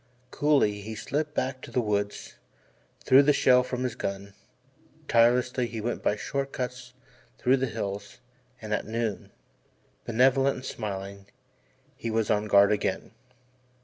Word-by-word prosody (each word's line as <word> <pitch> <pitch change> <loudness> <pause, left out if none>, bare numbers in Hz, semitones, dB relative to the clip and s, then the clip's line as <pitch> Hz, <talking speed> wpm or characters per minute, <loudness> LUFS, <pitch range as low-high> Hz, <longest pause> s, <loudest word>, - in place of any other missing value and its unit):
Coolly 135 -9 +2
he 110 +2 -7
slipped 150 +7 -3
back 130 0 -2
to - - -10
the - - 0
woods, 105 -3 -2 0.7
threw 130 +2 +7
the 145 +1 +4
shell 125 -2 +5
from 125 0 -4
his 125 -3 -2
gun, 100 -1 -5 0.7
tirelessly 125 +1 +3
he 115 -1 -6
went 120 +3 -3
by 105 - +1
short 135 +5 -3
cuts 125 0 -6 0.4
through 130 +1 +3
the 135 0 -1
hills, 100 -3 -5 0.4
and 110 -1 -5
at 105 - -2
noon, 110 -2 -3 0.8
benevolent 135 +3 +3
and 130 - -9
smiling, 100 -4 -6 0.7
he 115 - -5
was 110 -1 0
on 105 0 +1
guard 100 0 +5
again. 100 -2 -1
115 Hz, 145 wpm, -27 LUFS, 105-130 Hz, 0.8 s, threw